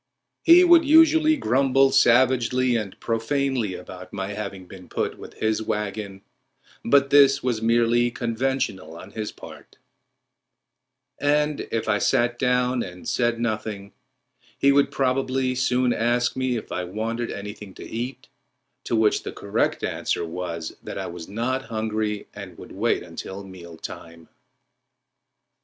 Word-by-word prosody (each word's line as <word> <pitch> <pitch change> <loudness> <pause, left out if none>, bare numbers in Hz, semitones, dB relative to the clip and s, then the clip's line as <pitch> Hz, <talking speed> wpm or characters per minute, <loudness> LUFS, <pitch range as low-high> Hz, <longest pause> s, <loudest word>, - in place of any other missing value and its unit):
He 345 +2 +7
would 345 -2 +7
usually 315 +1 +5
grumble 135 - +3
savagely 125 -1 +3
and 105 -4 -4
profanely 115 -2 -1
about 90 0 -10
my 95 -1 -4
having 100 -2 -6
been 90 -1 -13
put - - -3
with - - -11
his 110 0 0
wagon, 105 -2 -4 0.6
but 140 +3 +3
this 140 -1 +6
was 120 -3 -1
merely 120 +1 +3
conventional 115 -8 -2
on - - -11
his 110 -1 -5
part; - - -13 1.4
and 150 0 +1
if 115 - -2
I 105 - +2
sat 120 +2 +1
down 125 -1 +1
and 90 -3 -8
said 120 -1 0
nothing 110 -3 -3 0.7
he 140 - +4
would 140 0 +3
probably 130 -1 0
soon 125 -1 +1
ask 120 +1 +1
me 130 -1 0
if 115 - -6
I 90 - -2
wanted 110 +6 -3
anything 105 -1 -8
to - - -9
eat, 120 +4 -5 0.6
to - - 0
which 110 -1 +3
the - - -6
correct - - -1
answer 85 - -2
was 85 -1 -5
that - - -7
I - - -3
was 85 -1 -8
not 120 +5 -2
hungry 110 -2 -2
and - - -10
would - - -11
wait - - 0
until 95 +1 -8
meal 85 -3 -11
time. 85 0 -10
115 Hz, 140 wpm, -24 LUFS, 100-130 Hz, 1.4 s, He